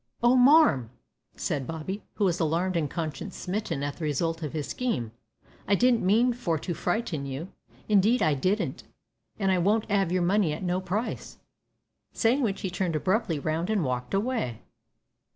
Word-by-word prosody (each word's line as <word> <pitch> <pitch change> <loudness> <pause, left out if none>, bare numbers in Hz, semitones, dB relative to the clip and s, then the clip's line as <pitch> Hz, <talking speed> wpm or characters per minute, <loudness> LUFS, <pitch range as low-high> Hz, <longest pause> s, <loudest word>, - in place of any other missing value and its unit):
"Oh! 240 +1 +5
marm," 255 - +5 0.5
said 135 -3 -2
Bobby, 165 +6 -5
who 205 - +1
was 175 -2 +1
alarmed 170 +3 0
and 155 -4 0
conscience 165 +4 -5
smitten 185 -7 -3
at 145 0 -3
the 170 - -7
result 165 +3 -1
of 150 - -3
his 150 -3 -2
scheme, 225 - -2 0.6
"I 200 - +4
didn't 245 +2 +3
mean 230 +6 +3
for 175 -9 -1
to 175 +4 -4
frighten 170 -5 -2
you. 140 +7 -5 0.4
Indeed 215 +4 +4
I 155 - +3
didn't, 185 +10 -1 0.5
an' 195 -2 +1
I 185 - +2
won't 210 +5 +2
'ave 195 -4 +2
your 180 -1 +1
money 185 -3 +2
at 155 - -6
no 180 +1 0
price." 200 +6 -4 0.8
Saying 245 +5 +2
which 205 -6 -1
he 190 - -3
turned 180 -2 -1
abruptly 185 +1 0
round 155 +5 -2
and 205 -7 +1
walked 125 +3 -2
away. 200 - -2
185 Hz, 170 wpm, -27 LUFS, 155-215 Hz, 0.8 s, Oh